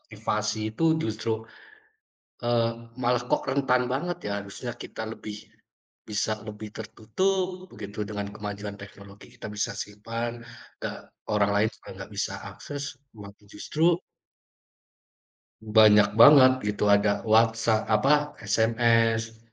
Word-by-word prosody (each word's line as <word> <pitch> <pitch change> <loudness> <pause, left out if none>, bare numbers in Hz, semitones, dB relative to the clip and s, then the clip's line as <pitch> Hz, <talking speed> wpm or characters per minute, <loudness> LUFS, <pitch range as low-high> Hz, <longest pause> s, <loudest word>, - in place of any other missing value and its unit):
aktivasi 110 0 -3
itu 135 - -1 0.2
justru 110 -1 -2 1.0
e 120 - -3 0.5
malah 120 0 +2
kok - - +1
rentan 130 -2 +2
banget 175 +6 -2
ya 105 - -2
harusnya 100 +5 -7
kita 115 - -8
lebih 105 -2 -8 0.7
bisa 105 +1 -1 0.2
lebih 105 0 -7
tertutup 185 - -2
begitu 100 0 -9
dengan 100 -1 -4
kemajuan 105 0 -6
teknologi 100 0 -13
kita - - -7
bisa - - 0
simpan 115 +3 -5 0.4
da - - -2 0.4
orang 105 -1 +2
lain 105 +2 +3
juga - - -15
nggak - - -9
bisa - - -2 0.2
akses, 145 0 -7 0.3
wa 100 -1 -9 0.2
justru 165 +2 +1 1.7
banyak 105 -1 +6
banget 135 -2 +9 0.2
gitu, 105 0 -1
ada 100 0 +1
WhatsApp 110 0 +3
apa 150 +5 +2
SMS 115 +1 +2
110 Hz, 115 wpm, -26 LUFS, 105-120 Hz, 1.7 s, banget